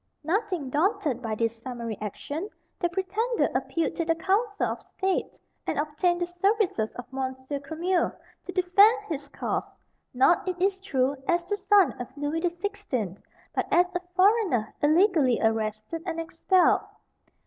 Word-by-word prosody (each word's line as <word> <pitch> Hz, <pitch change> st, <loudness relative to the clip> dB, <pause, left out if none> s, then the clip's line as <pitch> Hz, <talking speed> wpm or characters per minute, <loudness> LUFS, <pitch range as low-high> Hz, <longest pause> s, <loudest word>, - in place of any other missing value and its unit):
Nothing 360 Hz, -, -1 dB
daunted 310 Hz, -, +1 dB
by 225 Hz, -3 st, -2 dB
this 230 Hz, +1 st, -1 dB
summary 235 Hz, -3 st, -5 dB
action, 290 Hz, -, -5 dB, 0.3 s
the 345 Hz, -, +1 dB
pretender 405 Hz, +7 st, 0 dB
appealed 330 Hz, -1 st, -1 dB
to 335 Hz, -, +1 dB
the 330 Hz, 0 st, +1 dB
Council 405 Hz, +5 st, +1 dB
of -, -, -3 dB
State, 385 Hz, -1 st, -2 dB, 0.3 s
and -, -, -1 dB
obtained 330 Hz, +4 st, 0 dB
the -, -, +2 dB
services 355 Hz, -, +1 dB
of 245 Hz, -, -6 dB
Monsieur 260 Hz, +1 st, -3 dB
Cremieux 335 Hz, +6 st, 0 dB, 0.4 s
to -, -, -3 dB
defend 375 Hz, +5 st, +5 dB
his 285 Hz, -3 st, -4 dB
cause, -, -, -4 dB, 0.3 s
not, 305 Hz, +9 st, +3 dB
it 360 Hz, -1 st, -4 dB
is 380 Hz, +1 st, +1 dB
true, 275 Hz, -7 st, +1 dB
as 345 Hz, 0 st, +1 dB
the 410 Hz, -, +1 dB
son 400 Hz, -1 st, +4 dB
of 245 Hz, -, -5 dB
Louis 290 Hz, +3 st, -1 dB
the 350 Hz, +1 st, +1 dB
Sixteenth, 345 Hz, -, -4 dB, 0.3 s
but -, -, -1 dB
as 360 Hz, +1 st, +4 dB
a -, -, +2 dB, 0.2 s
foreigner 370 Hz, -, +3 dB
illegally 310 Hz, -, +4 dB
arrested 220 Hz, +6 st, -1 dB
and 335 Hz, -1 st, -2 dB
expelled. 330 Hz, +3 st, +3 dB
340 Hz, 150 wpm, -27 LUFS, 265-385 Hz, 0.4 s, defend